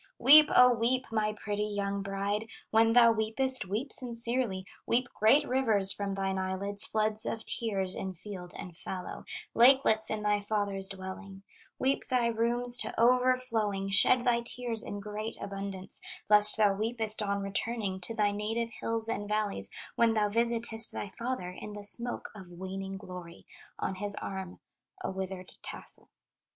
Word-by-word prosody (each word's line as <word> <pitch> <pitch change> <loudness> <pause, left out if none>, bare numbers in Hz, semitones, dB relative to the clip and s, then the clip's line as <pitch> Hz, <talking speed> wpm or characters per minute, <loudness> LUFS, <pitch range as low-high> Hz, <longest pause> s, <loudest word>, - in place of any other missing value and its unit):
"Weep, 300 +4 +7
O 250 0 +7
weep, 245 +3 0
my 215 -1 0
pretty 210 0 -4
young 200 -1 -3
bride. 200 +3 -3 0.2
When 225 +1 +4
thou 235 -1 +6
weepest, 225 +3 0
weep 220 +9 -3
sincerely, 235 -5 -3 0.2
Weep 245 +2 +1
great 225 +8 +3
rivers 220 -7 +3
from 200 -1 -2
thine 195 -1 -2
eyelids, 195 +2 +2
Floods 215 0 +2
of 225 - -3
tears 195 -5 0
in 190 -1 -5
field 180 -1 -8
and 175 -2 -9
fallow, 180 +2 -6 0.3
Lakelets 235 -3 +4
in 215 -1 -3
thy 210 0 +1
father's 200 -2 -1
dwelling; 195 0 -8 0.3
Weep 270 +1 0
thy 250 -2 +1
rooms 240 +2 +4
to - - 0
overflowing, 235 -5 +1
Shed 210 +5 +7
thy 240 -1 +1
tears 235 -1 -1
in 205 - -6
great 210 +2 -5
abundance, 195 - -7 0.3
Lest 210 +1 +6
thou 210 -2 +3
weepest 220 +1 -3
on 200 -1 -2
returning 195 0 -3
To 225 +6 0
thy 210 -1 +1
native 225 +3 -3
hills 225 0 -3
and 205 -2 -4
valleys, 205 - -2 0.3
When 230 -1 +2
thou 210 -1 +1
visitest 230 0 +3
thy 205 - -6
father 230 -3 -4
In 210 +3 -9
the 205 0 -8
smoke 235 +4 -5
of 190 -4 -12
waning 190 +2 -6
glory, 180 -3 -11 0.3
On - - -3
his 205 +2 -3
arm 190 -2 -7 0.4
a - - -3
withered 190 -1 -6
tassel. - - -10
210 Hz, 155 wpm, -29 LUFS, 195-235 Hz, 0.4 s, Weep